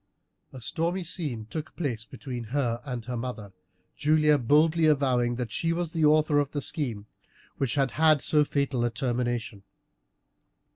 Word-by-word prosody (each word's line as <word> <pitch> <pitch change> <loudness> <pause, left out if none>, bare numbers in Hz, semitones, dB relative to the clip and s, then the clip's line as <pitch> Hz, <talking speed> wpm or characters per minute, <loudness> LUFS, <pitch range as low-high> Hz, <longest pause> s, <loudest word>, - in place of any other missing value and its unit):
A 130 - -9
stormy 170 - -1
scene 150 -10 -4
took 155 +4 -6
place 120 -9 -3
between 125 -1 -7
her 120 -1 -1
and 125 -5 -5
her 125 0 -4
mother, 115 -5 -5 0.4
Julia 150 0 +3
boldly 155 +6 +3
avowing 130 -5 +2
that 120 -3 -4
she 165 +7 0
was 170 -1 -3
the 160 -2 +2
author 150 -1 +4
of 145 -1 0
the 145 - -2
scheme 115 -10 -3 0.5
which 135 -3 -1
had 135 -2 +1
had 155 -1 +4
so 150 -1 +4
fatal 140 -4 -1
a 120 - +2
termination. 120 -3 -2
140 Hz, 155 wpm, -27 LUFS, 120-155 Hz, 0.5 s, author